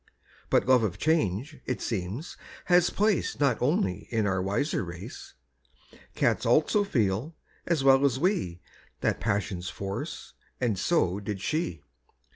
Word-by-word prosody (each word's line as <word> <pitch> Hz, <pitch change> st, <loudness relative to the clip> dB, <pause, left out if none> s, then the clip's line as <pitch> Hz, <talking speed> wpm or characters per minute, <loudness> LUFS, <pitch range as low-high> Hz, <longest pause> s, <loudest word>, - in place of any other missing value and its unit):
But -, -, +3 dB
love 130 Hz, -2 st, +6 dB
of 100 Hz, -4 st, -1 dB
change, 150 Hz, -, 0 dB
it 125 Hz, -, -1 dB
seems, 110 Hz, -, -4 dB, 0.3 s
has 180 Hz, -1 st, +4 dB
place 210 Hz, -3 st, 0 dB
Not 140 Hz, -5 st, +2 dB
only 120 Hz, -, 0 dB
in 110 Hz, -3 st, 0 dB
our 95 Hz, -2 st, +1 dB
wiser 100 Hz, +7 st, 0 dB
race; 85 Hz, -1 st, -9 dB, 0.8 s
Cats -, -, +1 dB
also 205 Hz, +7 st, +3 dB
feel, 120 Hz, -, 0 dB, 0.3 s
as 165 Hz, -5 st, +1 dB
well 135 Hz, 0 st, +6 dB
as 135 Hz, -2 st, +3 dB
we, 135 Hz, -, 0 dB, 0.4 s
That -, -, 0 dB
passion's 90 Hz, -3 st, -1 dB
force, 100 Hz, -, -6 dB, 0.3 s
and 115 Hz, -7 st, 0 dB
so 100 Hz, -, +1 dB
did 100 Hz, -1 st, -4 dB
she. 95 Hz, -, -2 dB
120 Hz, 135 wpm, -28 LUFS, 95-155 Hz, 0.8 s, love